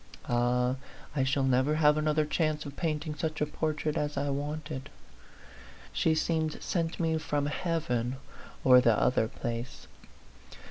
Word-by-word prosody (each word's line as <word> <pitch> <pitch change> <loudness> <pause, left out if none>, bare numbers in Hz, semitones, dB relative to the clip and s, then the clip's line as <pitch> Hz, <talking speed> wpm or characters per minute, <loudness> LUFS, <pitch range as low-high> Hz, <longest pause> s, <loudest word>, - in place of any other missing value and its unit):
Ah, 125 +1 +1 0.4
I 135 - +2
shall 135 +1 +1
never 130 +3 +3
have 150 -1 +5
another 155 0 +1
chance 155 0 0
of 140 -1 -7
painting 155 -2 -2
such 155 +1 -3
a 150 - +2
portrait 155 0 -2
as 150 -2 -1
I 140 0 0
wanted. 145 -1 -4 1.0
She 160 - +2
seemed 160 -1 0
sent 165 -2 -2
me 160 -2 +1
from 145 -2 -1
heaven 145 -6 -1 0.5
or 125 -1 +8
the 115 -3 +4
other 115 -3 +2
place. 120 +2 -5
150 Hz, 140 wpm, -30 LUFS, 130-155 Hz, 1.0 s, or